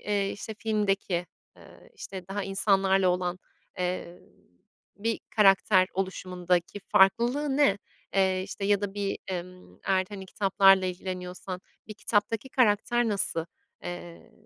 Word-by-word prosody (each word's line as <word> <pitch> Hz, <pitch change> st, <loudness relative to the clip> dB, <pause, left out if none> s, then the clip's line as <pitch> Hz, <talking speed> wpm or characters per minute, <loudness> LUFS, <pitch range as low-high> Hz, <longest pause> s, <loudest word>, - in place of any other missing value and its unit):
eee, 200 Hz, -1 st, 0 dB
işte, 220 Hz, +2 st, -7 dB
filmdeki, 200 Hz, -5 st, 0 dB, 0.3 s
ııı, -, -, -17 dB
işte, 190 Hz, -1 st, -8 dB
daha 200 Hz, +1 st, -3 dB
insanlarla 195 Hz, -1 st, +2 dB
olan, 180 Hz, 0 st, -1 dB, 0.4 s
eee, 180 Hz, -1 st, -3 dB, 0.8 s
bir 225 Hz, +2 st, -2 dB, 0.2 s
karakter 195 Hz, -2 st, +5 dB
oluşumundaki 180 Hz, 0 st, -1 dB
farklılığı 245 Hz, +9 st, +3 dB
ne? 275 Hz, -9 st, +4 dB, 0.4 s
Eee, 190 Hz, -1 st, +2 dB
işte, 200 Hz, +1 st, -6 dB
ya 200 Hz, 0 st, +3 dB
da 200 Hz, -1 st, -4 dB
bir, 200 Hz, -1 st, -2 dB
emm, 180 Hz, -, -7 dB
eğer, 190 Hz, -1 st, +2 dB
hani, 195 Hz, -2 st, -8 dB
kitaplarla 195 Hz, -1 st, +4 dB
ilgileniyorsan 180 Hz, 0 st, -5 dB, 0.3 s
bir 215 Hz, -, -7 dB
kitaptaki 215 Hz, +3 st, -1 dB
karakter 240 Hz, -1 st, +2 dB
nasıl, 190 Hz, -5 st, 0 dB, 0.4 s
eee, 175 Hz, +5 st, -8 dB
195 Hz, 120 wpm, -28 LUFS, 185-205 Hz, 0.8 s, karakter